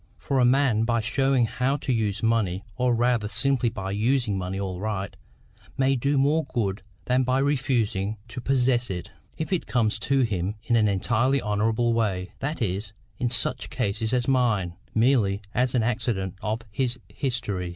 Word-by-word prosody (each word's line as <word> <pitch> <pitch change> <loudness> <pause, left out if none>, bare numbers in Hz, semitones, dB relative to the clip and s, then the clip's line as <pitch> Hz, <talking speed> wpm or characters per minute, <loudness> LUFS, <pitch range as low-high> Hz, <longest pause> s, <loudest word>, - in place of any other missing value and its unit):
For 135 - -1
a 125 - +5
man 125 -3 +3
by 115 0 +1
showing 135 +2 +2
how 130 +5 0
to 135 -2 -1
use 105 -3 -1
money, 110 -5 +1
or 125 -1 +2
rather 120 -2 +1
simply 120 +3 +2
by 95 -3 -5
using 115 +1 +1
money 95 +1 -3
aright, 100 +1 -3 0.6
may 135 0 +3
do 140 +3 +1
more 145 +4 +3
good 100 -7 -2 0.2
than 125 +1 +2
by 130 0 +1
refusing 120 -7 0
to 125 +2 -6
possess 125 -2 +2
it, 90 -2 -5 0.3
if 160 +4 -2
it 180 - -1
comes 110 -2 +1
to 135 +4 +2
him 100 -4 -1
in 120 0 +1
an 110 -2 +4
entirely 120 +7 +2
honourable 110 +2 +1
way, 100 -5 -1
that 145 -2 -2
is, 100 +1 -3 0.3
in 125 - +1
such 115 -2 0
a - - -11
case 110 -3 -2
as 125 -2 +1
mine, 115 -10 +2 0.2
merely 110 -4 +3
as 125 +1 +1
an 120 - +3
accident 110 -5 -1
of 110 +2 -2
his 125 +2 0
history. 105 -9 -2
115 Hz, 170 wpm, -25 LUFS, 105-130 Hz, 0.6 s, a